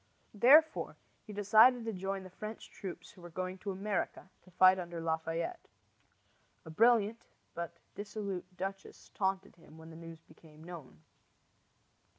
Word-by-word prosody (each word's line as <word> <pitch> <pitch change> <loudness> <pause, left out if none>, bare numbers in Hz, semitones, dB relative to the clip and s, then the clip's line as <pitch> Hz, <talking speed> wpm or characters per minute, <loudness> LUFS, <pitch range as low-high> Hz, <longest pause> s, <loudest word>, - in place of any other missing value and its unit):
Therefore 285 +9 +5 0.3
he - - -7
decided 220 +4 +5
to 225 - -2
join 195 +1 -3
the 185 - -11
French 215 +3 -8
troops 190 -3 -8
who 180 - -17
were 175 - -10
going 185 +2 -4
to 205 - -5
America 195 -1 -3
to - - -20
fight 185 +1 +6
under 175 -1 -5
Lafayette. 165 - -3 1.0
A 160 - -9
brilliant 225 +3 +3 0.3
but 170 0 -6 0.2
dissolute 200 -3 -6
duchess 195 +1 -6
taunted 190 -1 -2
him 160 -1 -17
when 160 0 -12
the - - -11
news 165 0 -11
became 155 -1 -17
known. 155 - -11
185 Hz, 145 wpm, -33 LUFS, 170-210 Hz, 1.0 s, fight